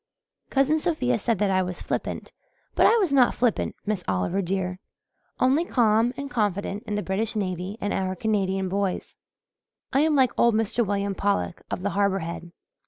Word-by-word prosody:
Cousin 280 Hz, +3 st, +2 dB
Sophia 265 Hz, -8 st, 0 dB
said 230 Hz, +1 st, 0 dB
that 200 Hz, 0 st, +1 dB
I 185 Hz, 0 st, +3 dB
was 180 Hz, -1 st, -5 dB
flippant -, -, -4 dB, 0.4 s
but -, -, +5 dB
I 465 Hz, -, +5 dB
was 375 Hz, -10 st, +1 dB
not 255 Hz, -3 st, +4 dB
flippant, 240 Hz, -2 st, 0 dB
Miss 205 Hz, -4 st, -2 dB
Oliver, 95 Hz, -, 0 dB
dear, 185 Hz, 0 st, -2 dB, 0.6 s
only 270 Hz, +6 st, +3 dB
calm 230 Hz, -6 st, +3 dB
and 280 Hz, -, -4 dB
confident 205 Hz, -5 st, -1 dB
in 210 Hz, -, -2 dB
the 210 Hz, -, -1 dB
British 210 Hz, +4 st, -1 dB
navy 185 Hz, 0 st, -3 dB
and 205 Hz, -, -2 dB
our 190 Hz, -1 st, -1 dB
Canadian 195 Hz, -2 st, 0 dB
boys. 195 Hz, 0 st, -2 dB, 0.8 s
I 270 Hz, -, +4 dB
am 310 Hz, +1 st, +3 dB
like 260 Hz, -3 st, +4 dB
old 235 Hz, -2 st, +4 dB
Mr. 225 Hz, +2 st, +1 dB
William 200 Hz, -1 st, -1 dB
Pollock 200 Hz, -2 st, -1 dB
of 180 Hz, -, -4 dB
the 205 Hz, -, 0 dB
Harbour 200 Hz, -1 st, +1 dB
Head. 170 Hz, 0 st, -7 dB
205 Hz, 175 wpm, -25 LUFS, 190-245 Hz, 0.8 s, but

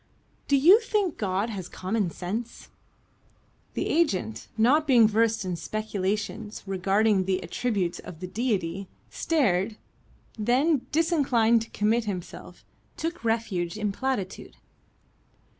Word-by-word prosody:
"Do 280 Hz, -, +4 dB
you 350 Hz, +11 st, +7 dB
think 420 Hz, -7 st, -1 dB
God 200 Hz, +2 st, -1 dB
has 190 Hz, -4 st, -5 dB
got -, -, -14 dB
common 190 Hz, 0 st, 0 dB
sense?" 215 Hz, +8 st, -5 dB, 1.1 s
The -, -, -1 dB
agent, 255 Hz, -, 0 dB
not 280 Hz, +8 st, +4 dB
being 240 Hz, -5 st, +6 dB
versed 220 Hz, -1 st, +1 dB
in 180 Hz, -1 st, -2 dB
speculations 210 Hz, +1 st, -3 dB
regarding 195 Hz, +1 st, +2 dB
the 190 Hz, 0 st, 0 dB
attributes 195 Hz, -8 st, -1 dB
of 160 Hz, -, -10 dB
the 185 Hz, -, -5 dB
Deity, 195 Hz, -4 st, -2 dB, 0.2 s
stared; 215 Hz, -, +1 dB, 0.6 s
then, 255 Hz, +5 st, +2 dB
disinclined 270 Hz, -8 st, +3 dB
to 225 Hz, -, -7 dB
commit 220 Hz, +3 st, +1 dB
himself, 185 Hz, -4 st, -7 dB, 0.3 s
took 335 Hz, -2 st, -4 dB
refuge 215 Hz, -6 st, -1 dB
in 210 Hz, -1 st, -1 dB
platitude. 215 Hz, -4 st, -3 dB
215 Hz, 120 wpm, -26 LUFS, 190-250 Hz, 1.1 s, you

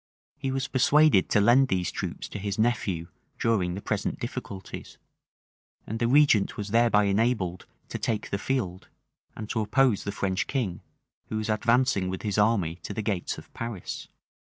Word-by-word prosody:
He 135 Hz, -, -2 dB
was 135 Hz, 0 st, -1 dB
persuaded 140 Hz, -4 st, +4 dB
to -, -, +4 dB
lend 120 Hz, +6 st, +5 dB
these 90 Hz, -5 st, 0 dB
troops -, -, -5 dB
to 105 Hz, -, -6 dB
his 100 Hz, 0 st, -3 dB
nephew 110 Hz, -7 st, 0 dB, 0.3 s
during 95 Hz, -6 st, +1 dB
the 100 Hz, -, -7 dB
present -, -, -2 dB
difficulties;[] 95 Hz, -2 st, -7 dB, 0.9 s
and 110 Hz, +1 st, -4 dB
the 115 Hz, -, +2 dB
regent 135 Hz, -6 st, +4 dB
was 105 Hz, -1 st, -4 dB
thereby 115 Hz, -1 st, +4 dB
enabled 100 Hz, -3 st, 0 dB, 0.2 s
to -, -, -4 dB
take 110 Hz, -2 st, -2 dB
the 100 Hz, -, -1 dB
field, 100 Hz, -8 st, -2 dB, 0.5 s
and 110 Hz, -, -6 dB
to 110 Hz, -, 0 dB
oppose 110 Hz, +1 st, +2 dB
the 100 Hz, -, -3 dB
French 95 Hz, -2 st, -1 dB
king, 110 Hz, -10 st, -2 dB, 0.5 s
who 110 Hz, -, -2 dB
was 110 Hz, 0 st, -3 dB
advancing 115 Hz, -2 st, +2 dB
with 95 Hz, 0 st, -5 dB
his 105 Hz, -1 st, 0 dB
army 100 Hz, -6 st, +2 dB
to 100 Hz, -, -6 dB
the 110 Hz, -, -2 dB
gates 100 Hz, -4 st, -2 dB
of -, -, -13 dB
Paris. 115 Hz, -5 st, -5 dB
105 Hz, 170 wpm, -27 LUFS, 95-120 Hz, 0.9 s, lend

